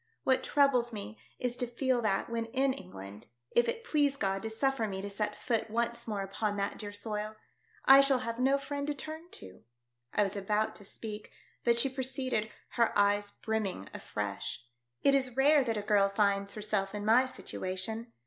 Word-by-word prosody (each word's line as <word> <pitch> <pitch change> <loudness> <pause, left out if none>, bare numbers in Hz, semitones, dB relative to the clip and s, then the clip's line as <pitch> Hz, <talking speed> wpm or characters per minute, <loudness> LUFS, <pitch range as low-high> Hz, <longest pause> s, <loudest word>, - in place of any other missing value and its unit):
What 260 -1 +3
troubles 260 -4 +3
me 215 0 -7 0.2
is 245 -1 -2
to 245 - -1
feel 245 +1 0
that 210 -4 +1
when 230 -1 -2
in 265 +3 +1
England 100 - -10
— - - -52
If 240 0 +3
it 465 - -3
please 290 -10 +2
God 195 -4 0
to 220 - -3
suffer 230 0 0
me 190 -2 -4
to 200 +1 -5
set 210 +1 -2
foot 225 -1 -1
once 235 +1 -1
more; 205 -3 -2
upon 205 +1 -2
that 200 0 -2
dear 205 -2 -5
soil 210 +1 -4 0.3
— 450 -1 -33
I 270 +1 +10
shall 275 -1 +4
have 230 -2 -4
no 270 +2 +4
friend 285 +1 -4
to 295 - -1
turn 315 +4 -7
to." 95 -1 -10 0.5
I 210 - +3
was 195 0 -2
about 210 +2 0
to 205 - -13
speak, 210 +1 -8 0.3
but 235 -1 +4
she 235 - +4
proceeded, 260 -4 -2 0.2
her 235 -3 +1
eyes 205 0 +3
brimming 205 - -3
afresh 105 +3 -4
— 120 0 -52
" 120 - -41
It 275 - +5
is 260 -2 +1
rare 285 +1 +6
that 230 -3 -1
a 205 - -2
girl 205 -1 +4
finds 200 -1 +1
herself 210 -2 -1
in 205 0 -4
my 245 +4 +5
situation. 220 +1 -4
220 Hz, 200 wpm, -31 LUFS, 205-260 Hz, 0.5 s, I